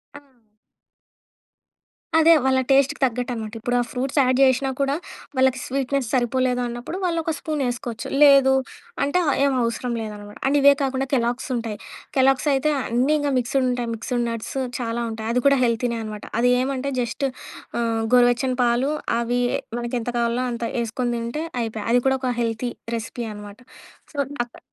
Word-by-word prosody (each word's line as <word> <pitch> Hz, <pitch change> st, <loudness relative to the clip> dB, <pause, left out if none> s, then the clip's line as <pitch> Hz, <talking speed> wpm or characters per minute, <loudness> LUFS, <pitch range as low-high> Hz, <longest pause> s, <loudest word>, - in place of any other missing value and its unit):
ఆ! -, -, -8 dB, 2.0 s
అదే, 325 Hz, +1 st, +7 dB
వాళ్ళ 260 Hz, 0 st, +3 dB
టేస్ట్‌కి 275 Hz, +2 st, +3 dB
తగ్గట్టనమాట. 240 Hz, -3 st, -3 dB
ఇప్పుడు 245 Hz, +2 st, -1 dB
ఆ -, -, +3 dB
ఫ్రూట్స్ 265 Hz, +1 st, -3 dB
యాడ్‌ 255 Hz, 0 st, +2 dB
జేసినా 265 Hz, 0 st, +4 dB
కూడా, 275 Hz, +1 st, +1 dB, 0.4 s
వాళ్ళకి 260 Hz, 0 st, +3 dB
స్వీట్‌నెస్ 270 Hz, -1 st, -1 dB
సరిపోలేదన్నప్పుడు 250 Hz, +2 st, 0 dB
వాళ్లొక 330 Hz, -2 st, 0 dB
స్పూనేసుకోవచ్చు. 245 Hz, -6 st, -3 dB, 0.2 s
లేదు 275 Hz, -2 st, +7 dB, 0.5 s
అంటే 285 Hz, +6 st, +1 dB
ఆహ్, 290 Hz, -, +2 dB
ఏం 280 Hz, -, +3 dB
అవసరం 235 Hz, +1 st, -2 dB
లేదనమాట. 210 Hz, -1 st, -8 dB
అండ్ 285 Hz, +2 st, +3 dB
ఇవే 280 Hz, 0 st, +7 dB
కాకుండా 270 Hz, 0 st, -1 dB
కెలాగ్సుంటాయి. 240 Hz, -2 st, -2 dB, 0.4 s
కెలాగ్సయితే 270 Hz, +2 st, +3 dB
అన్నీ 250 Hz, +5 st, +1 dB
ఇంకా 290 Hz, -1 st, 0 dB
మిక్స్‌డుంటాయి. 245 Hz, -1 st, 0 dB
మిక్స్‌డు 240 Hz, +2 st, -2 dB
నట్స్ 230 Hz, +2 st, -5 dB, 0.2 s
చాలా 235 Hz, -1 st, -2 dB
ఉంటాయి. 220 Hz, 0 st, -5 dB
అది 250 Hz, -, +2 dB
కూడా 280 Hz, 0 st, +5 dB
హెల్తీనే 235 Hz, 0 st, 0 dB
అనమాట. 215 Hz, -1 st, -7 dB, 0.2 s
అదేమంటే 255 Hz, +3 st, +1 dB
జస్ట్ 240 Hz, +3 st, -2 dB, 0.5 s
ఆహ్, 230 Hz, -1 st, 0 dB
గోరువెచ్చని 245 Hz, +1 st, +4 dB
పాలు, 240 Hz, +4 st, +2 dB, 0.3 s
అవి 240 Hz, +1 st, 0 dB, 0.4 s
మనకు 240 Hz, +1 st, -3 dB
ఎంత 225 Hz, -, -4 dB
కావాలనో 235 Hz, +2 st, 0 dB
అంత 235 Hz, -, -5 dB, 0.2 s
ఏసుకొని 240 Hz, +2 st, -2 dB
తింటే 235 Hz, +7 st, -3 dB, 0.2 s
అయిపాయ. 220 Hz, -2 st, -4 dB
అది 245 Hz, -, +5 dB
కూడా 265 Hz, -, +3 dB
ఒక 260 Hz, -, -1 dB
హెల్తీ 230 Hz, +1 st, -1 dB, 0.3 s
రెసిపీ 230 Hz, +1 st, -5 dB
అనమాట. 205 Hz, 0 st, -10 dB, 0.6 s
సో, -, -, -11 dB, 0.3 s
అక్కడ 240 Hz, -, -15 dB
250 Hz, 145 wpm, -23 LUFS, 235-270 Hz, 2.0 s, అదే